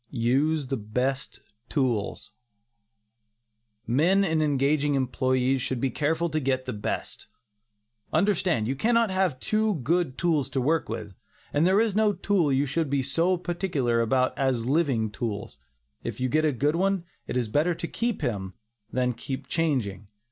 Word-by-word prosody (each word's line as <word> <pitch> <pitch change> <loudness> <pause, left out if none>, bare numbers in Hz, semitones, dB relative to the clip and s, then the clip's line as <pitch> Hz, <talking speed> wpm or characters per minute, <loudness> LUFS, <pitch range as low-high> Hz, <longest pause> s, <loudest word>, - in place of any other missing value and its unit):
USE 140 +5 +1
THE 135 +1 -2
BEST 125 +5 -2 0.3
TOOLS. 125 -8 -1 1.5
Men 170 +11 +3
in 160 -4 +1
engaging 145 0 +2
employees 130 0 +1
should 130 0 -2
be 130 +1 0
careful 160 +6 0
to 155 - +1
get 130 -2 -1
the 125 - -3
best. 105 -1 -4 0.8
Understand, 180 - +2
you 135 - -1
cannot 230 - +2
have 185 -8 +1
too 215 +3 +1
good 165 -1 +1
tools 160 -5 +1
to 135 - -1
work 155 +5 +1
with, 110 -3 -5 0.4
and 150 +4 +3
there 190 +2 +4
is 220 -3 +1
no 215 -1 +3
tool 190 -8 +1
you 135 +2 +2
should 150 +2 -1
be 140 -1 +1
so 165 +7 +1
particular 170 -10 0
about 130 +2 +1
as 130 -4 0
living 130 -7 +1
tools. 100 -7 -4 0.5
If 115 -1 -5
you 130 0 0
get 155 +4 +2
a 155 - +3
good 145 +4 +1
one, 195 0 +1 0.2
it - - -2
is 120 -3 0
better 155 +10 +1
to 170 - -4
keep 235 +2 -2
him, 95 -5 -3 0.4
than 125 0 +1
keep 135 +3 -6
changing. 125 - -1
140 Hz, 160 wpm, -26 LUFS, 125-170 Hz, 1.5 s, there